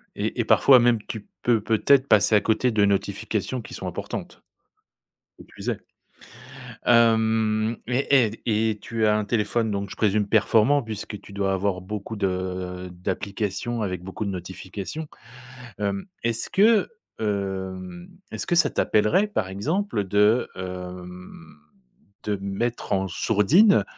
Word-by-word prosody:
Et - - -3
et - - +1
parfois 130 -2 +6
même 120 -2 +3
tu 110 -3 -7 0.2
peux 115 -3 +3
peut 110 0 0
être 140 -1 +5
passer 105 0 +4
à 105 - +5
côté 115 +3 +1
de 105 -2 +2
notifications 100 +4 -1
qui - - -11
sont - - -5
importantes? - - -6 1.0
Qui - - -13
plus - - -9
est. - - -4 1.1
Hem, 110 -1 +3
et 130 +1 +3
et 110 - -1
d 115 - -12
et 110 -1 +1
tu 115 -1 -1
as 105 - +3
un 105 - -1
téléphone 110 +1 0
donc 100 0 -3
je - - -8
présume 105 -1 +1
performant, 115 +6 +3
puisque 105 -1 -6
tu 100 - -14
dois 100 -1 0
avoir 95 -1 -1
beaucoup 105 +3 -6
de 90 -1 -3
d'applications 100 +5 -3
avec 90 -3 -4
beaucoup 95 +3 -5
de 100 - -2
notifications? 95 - -6 0.7
Hem, 100 - -2 0.2
est 115 0 +1
ce 115 - -2
que, 215 +2 +4 0.3
hem, 95 -3 -4 0.2
est - - -5
ce - - -3
que 175 - +1
ça 170 - +4
t'appellerait 110 - +2
par 110 - -2
exemple 135 - -1
de, 105 +5 +3
hem, 90 -3 -8 0.7
de 105 -1 -1
mettre 115 +5 -3
en 95 0 0
sourdine 130 - +4
105 Hz, 155 wpm, -24 LUFS, 95-115 Hz, 1.1 s, parfois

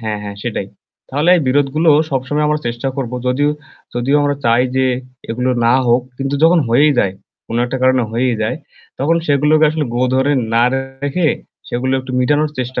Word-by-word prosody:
হ্যাঁ, 110 -2 -3
হ্যাঁ, 100 -1 -7
সেটাই। - - -3 0.4
তাহলে 145 +5 0
এই 165 - 0
বিরোধগুলো 145 +4 +2 0.2
সবসময় 140 +3 -1
আমরা 150 0 0
চেষ্টা 120 +3 -2
করব 125 -3 -3
যদিও 145 +4 +2 0.4
যদিও 125 +4 +1
আমরা 145 0 +1
চাই 115 +1 +4
যে, 130 - +3 0.4
এগুলো 125 +2 -1 0.2
না 120 - +4
হোক 120 +1 +3 0.2
কিন্তু 135 +1 -2
যখন 170 +2 +5
হয়েই 145 +6 +4
যায়, 95 -4 +2 0.3
কোন 115 - -4
একটা 130 +2 -3
কারণে 130 -1 +3
হয়েই 120 +1 +1
যায় 105 - -1 0.4
তখন 155 +5 +2
সেগুলোকে 150 +2 +3
আসলে 155 -1 -2
গো 125 - 0
ধরে 135 +2 +2 0.2
না 115 - +4
রেখে, 135 +5 -2 0.4
সেগুলো 130 +2 -2
একটু 130 0 -9
মিটানোর 145 +3 +1
চেষ্টা 130 0 -3
135 Hz, 180 wpm, -17 LUFS, 125-145 Hz, 0.4 s, যখন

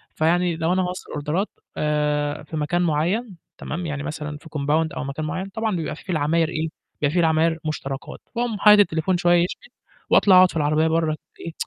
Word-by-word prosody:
فيعني 170 +2 +2
لو 165 +2 0
أنا 185 - +2
هاوصّل 180 0 -5
أوردرات 155 +7 -2 0.3
آآ، 150 -1 0
في 155 +1 -6
مكان 165 +4 0
معيّن، 175 +6 0 0.2
تمام، 170 +3 -5
يعني 145 -2 -4
مثلًا 150 -1 -5
في 160 - -15
كومباوند 150 +2 0
أو - - -4
مكان 140 +3 -4
معيّن، 185 +4 -4
طبعًا 220 -1 -2
بيبقى 160 -2 -3
فيه - - -14
في 185 - -5
العماير 160 +1 +1
إيه، 160 -1 -2 0.3
بيبقى 145 - +3
فيه - - -5
في 180 - +2
العماير 160 0 +3
مُشتركات، 135 -3 -5 0.2
باقوم 235 -3 -1
حاطط 210 0 +7
التليفون 175 -1 +2
شوية 175 0 +4
يشحن، - - -6 0.4
وأطلع 190 -3 +6
أقعد 185 0 +7
في - - -5
العربية 155 +2 +2
برّه 160 -1 +1 0.2
إيه 165 - -6
160 Hz, 200 wpm, -23 LUFS, 150-180 Hz, 0.4 s, حاطط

